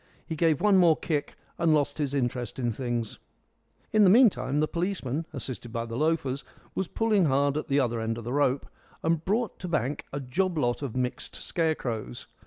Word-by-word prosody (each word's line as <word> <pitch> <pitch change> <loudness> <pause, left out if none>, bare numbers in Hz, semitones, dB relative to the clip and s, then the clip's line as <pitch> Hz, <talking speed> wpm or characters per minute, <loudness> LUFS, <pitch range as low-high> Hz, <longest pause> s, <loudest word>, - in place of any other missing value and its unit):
He 160 - -4
gave 160 -2 +2
one 205 -2 +4
more 170 -4 +5
kick, 150 -3 -2 0.2
and 165 -2 +4
lost 145 0 0
his 145 -2 -1
interest 125 -2 -2
in 120 -2 0
things. 120 -1 -3 0.7
In 215 -1 +6
the 190 - +7
meantime 200 - +4
the 155 - +2
policeman, 165 -4 -2
assisted 130 -4 -6
by 115 0 -2
the 115 0 -6
loafers, 145 -2 0 0.3
was 190 - -2
pulling 215 -5 +2
hard 140 0 +2
at 155 - -2
the 140 0 +2
other 120 -3 0
end 115 0 -2
of 115 - -6
the 120 +3 -4
rope, 140 -1 +2 0.4
and 165 -1 +1
brought 215 +3 -1
to 180 - -5
bank 145 -4 -1
a 140 - -3
job 170 +7 -1
lot 120 -3 0
of 135 -5 -4
mixed 125 -1 -3
scarecrows. 125 - -2
145 Hz, 195 wpm, -28 LUFS, 125-165 Hz, 0.7 s, the